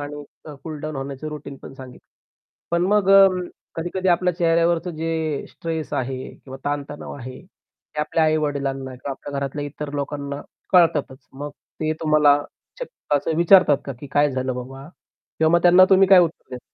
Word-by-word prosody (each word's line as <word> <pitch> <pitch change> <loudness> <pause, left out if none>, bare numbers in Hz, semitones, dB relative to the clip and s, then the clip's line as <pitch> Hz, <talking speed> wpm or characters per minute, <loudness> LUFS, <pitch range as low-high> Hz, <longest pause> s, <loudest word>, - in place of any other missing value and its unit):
आणि 145 0 -6 0.2
अ, 150 - -9
cool 155 -2 -6
down 155 -2 -5
होण्याचं 135 +2 -6
routine 145 -2 -8
पण - - -10
सांगितलं. 130 -2 -13 0.6
पण 170 0 +1
मग 200 -2 +3
अं, 195 -2 +6 0.3
कधी-कधी 175 +3 -2
आपल्या 180 0 +2
चेहऱ्यावरचं 170 0 +1
जे 160 -2 -2
स्ट्रेस 160 -4 -5
आहे 130 0 -3
किंवा 135 -1 -11
ताणतणाव 145 0 -4
आहे, 130 -1 -9
ते 160 -4 -11
आपल्या 155 +1 +1
आई-वडिलांना 140 -4 -1
किंवा 130 +2 -7
आपल्या 140 +1 -6
घरातल्या 140 +1 -3
इतर 145 0 -7
लोकांना 140 0 -4 0.3
कळतातच. 160 -7 +2
मग 145 +2 -7 0.3
ते 155 0 0
तुम्हाला 150 -2 +4 0.4
च - - -2 0.3
असं 155 +3 -2
विचारतात 170 -4 +5
का 140 - -5
की 145 - -8
काय 145 0 +3
झालं 130 -1 -2
बाबा? 135 +3 -8 0.5
किंवा 160 0 +3
मग 170 - 0
त्यांना 180 +1 +7
तुम्ही 190 0 +6
काय 190 -1 +8
उत्तर 165 -5 -2
देता? 125 - -8
150 Hz, 170 wpm, -22 LUFS, 140-165 Hz, 0.6 s, काय